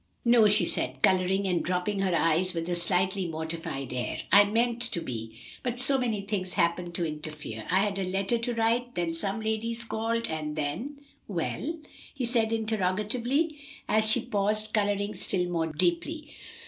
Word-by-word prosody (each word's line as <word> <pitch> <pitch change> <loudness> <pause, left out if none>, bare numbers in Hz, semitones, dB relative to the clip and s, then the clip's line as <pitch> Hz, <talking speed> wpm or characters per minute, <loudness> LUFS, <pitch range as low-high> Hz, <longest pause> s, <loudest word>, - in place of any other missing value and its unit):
"No," 235 -2 +6
she 205 -3 +4
said, 130 -4 -2
coloring 190 +1 +3
and 180 -2 +1
dropping 185 +3 -1
her 190 -3 +1
eyes 170 +3 +2
with 165 0 -2
a 175 - +1
slightly 185 +2 +1
mortified 160 -4 -4
air. 125 -1 -2
"I 200 +2 +8
meant 230 +3 +1
to 175 - 0
be, 115 -6 -6 0.2
but 245 -1 -2
so 270 +2 +2
many 225 -5 0
things 195 -3 -3
happened 170 -1 0
to 175 - 0
interfere. 150 -7 -6
I 185 +2 +4
had 200 -1 0
a 185 -1 -1
letter 195 +5 +1
to 235 +1 -2
write, 235 +2 +1
then 170 -2 0
some 195 +6 -2
ladies 225 +2 -2
called, 230 0 -1
and 155 -1 -3
then 160 - -3 0.2
" - - -38
"Well?" 300 - -2 0.4
he 265 -3 -1
said 230 -2 +1
interrogatively, 225 - 0 0.3
as 215 0 +3
she 220 - +4
paused, 215 +1 0
coloring 205 -1 +1
still 180 -2 0
more 165 -2 0
deeply. 310 - -1
200 Hz, 175 wpm, -28 LUFS, 170-230 Hz, 0.4 s, I